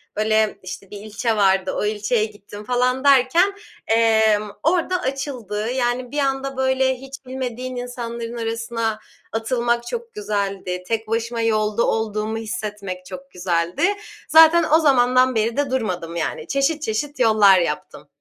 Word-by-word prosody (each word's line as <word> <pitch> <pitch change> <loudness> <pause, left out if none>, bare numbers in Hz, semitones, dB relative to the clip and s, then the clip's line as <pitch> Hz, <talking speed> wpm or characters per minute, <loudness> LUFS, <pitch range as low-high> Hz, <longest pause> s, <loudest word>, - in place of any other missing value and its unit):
böyle, 215 0 +1
işte, 185 +1 -8
bir 205 - -7
ilçe 215 +2 -2
vardı, 190 -2 +2
o - - -1
ilçeye 215 +1 0
gittim 205 -1 -11
falan 250 +3 0
derken, 280 +8 +4 0.3
emm, 220 -2 +3
orada 360 +2 +1
açıldı. 245 - -3
Yani, 250 0 -1
bir 295 - -5
anda, 270 -1 -1
böyle, 260 0 +2
hiç 270 +1 -11
bilmediğin 255 -1 -5
insanların 235 -1 -5
arasına 230 -1 -2 0.3
atılmak 235 +1 -1
çok 470 -1 -5
güzeldi. 200 -3 -3
Tek 225 -1 -2
başıma 230 +1 -2
yolda 215 0 +1
olduğumu 220 0 -1
hissetmek 210 -5 -5
çok 185 0 -10
güzeldi. 175 - -1 0.5
Zaten 320 +1 +7
o 320 - +7
zamandan 255 -3 +4
beri 225 +2 0
de 285 -2 0
durmadım, 180 -9 -2
yani. 165 - -3
Çeşit 280 +2 0
çeşit 285 +4 -3
yollar 215 -5 +6
yaptım. 170 - -4
230 Hz, 140 wpm, -21 LUFS, 210-260 Hz, 0.5 s, Zaten